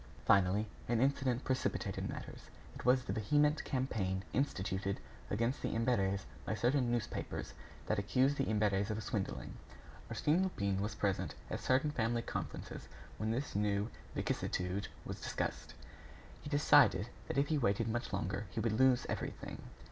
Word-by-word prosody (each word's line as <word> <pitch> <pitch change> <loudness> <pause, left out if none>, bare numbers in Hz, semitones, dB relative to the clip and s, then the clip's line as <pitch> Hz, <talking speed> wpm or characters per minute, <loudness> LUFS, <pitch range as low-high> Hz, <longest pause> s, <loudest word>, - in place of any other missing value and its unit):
Finally, 100 +2 +4 0.2
an 120 -2 +3
incident 135 -1 +2
precipitated 130 0 -1
matters; - - -7 0.2
it - - -9
was 125 +1 +4
the - - -3
vehement 145 +8 +3
campaign 105 -8 -1
instituted 100 -7 0 0.3
against 115 +6 0
the - - -1
Imberts 100 -5 +1 0.2
by 110 - -1
certain 125 +2 +2
newspapers 120 -3 -3 0.3
that 110 - +1
accused 130 +7 +2
the 135 - +1
Imberts 105 -2 +2
of 110 0 -2
swindling. 95 - -3 0.5
Arsène 155 +5 +2
Lupin 100 - 0
was 105 +1 -2
present 95 -6 0 0.2
at - - -1
certain 130 +3 +2
family 115 -2 0
conferences - - -5 0.3
when 110 - 0
this 125 +3 -2
new 105 +1 +1 0.2
vicissitude 90 +2 -1 0.2
was - - -5
discussed. - - -3 0.7
He - - -7
decided 145 -7 +5 0.2
that - - -3
if 140 +1 +3
he 155 -2 +2
waited 110 -1 +2
much 120 +2 -2
longer, 95 +3 -2
he - - -4
would 110 0 +1
lose 130 -2 +5
everything. - - -4
115 Hz, 150 wpm, -35 LUFS, 100-130 Hz, 0.7 s, decided